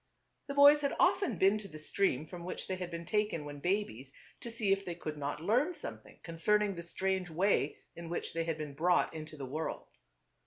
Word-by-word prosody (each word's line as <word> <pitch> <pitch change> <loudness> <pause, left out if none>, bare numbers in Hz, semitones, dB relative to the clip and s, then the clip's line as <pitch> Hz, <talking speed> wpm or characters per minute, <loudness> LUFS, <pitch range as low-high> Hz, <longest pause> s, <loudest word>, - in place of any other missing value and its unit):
The 280 - -4
boys 285 +1 +8
had 280 - 0
often 275 - +3
been 195 +4 +4
to 205 - -8
the 155 - -10
stream 155 -2 0
from 170 +2 -9
which 180 - -5
they 190 - -1
had 180 -1 -5
been 170 0 -6
taken 210 -7 0
when 145 0 -7
babies, 160 - -1 0.3
to 235 - -7
see 225 -4 0
if 195 0 +2
they 175 -3 -5
could 155 -3 -5
not 145 +1 -4
learn 255 - +2
something - - -8
concerning 205 +5 +1
the 170 - -6
strange 190 +1 -1
way 170 -3 +1 0.2
in 170 -1 -8
which 175 - -3
they 165 0 -1
had 165 -2 -1
been 150 -2 -5
brought 175 +5 +2
into 155 -1 -7
the 140 - -5
world. 155 +5 -4
175 Hz, 210 wpm, -33 LUFS, 155-205 Hz, 0.3 s, boys